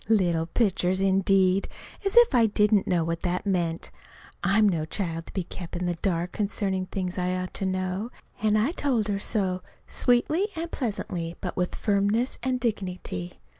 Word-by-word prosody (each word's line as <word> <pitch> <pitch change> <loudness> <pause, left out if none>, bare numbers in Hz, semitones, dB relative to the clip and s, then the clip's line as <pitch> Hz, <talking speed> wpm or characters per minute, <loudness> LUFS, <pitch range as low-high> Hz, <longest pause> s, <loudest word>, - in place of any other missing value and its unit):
"Little 175 -7 +2
pitchers," 185 -2 +1
indeed! 195 0 +3 0.4
As 395 +1 -1
if 475 -8 +7
I 235 -3 +5
didn't 210 -1 +3
know 175 -2 +2
what 165 0 -2
that 180 +2 -1
meant! 175 -4 -1 0.5
I'm 200 +3 +4
no 170 -6 +1
child 165 0 -3
to - - -11
be 190 - -1
kept 175 0 -8
in 180 +1 -2
the 175 - 0
dark 175 0 -1
concerning 195 -2 -1
things 185 -1 -3
I 180 0 0
ought 185 0 -4
to 195 - -1
know. 185 +3 -2 0.3
And 215 0 +3
I 225 +8 +2
told 250 - 0
her 200 -1 0
so, 190 -3 -1 0.3
sweetly 300 +11 +2
and 330 +1 -4
pleasantly, 180 - -3
but 180 - -4
with 180 -1 -1
firmness 205 +4 +1
and 255 0 0
dignity. 185 - -3
190 Hz, 170 wpm, -26 LUFS, 180-215 Hz, 0.5 s, if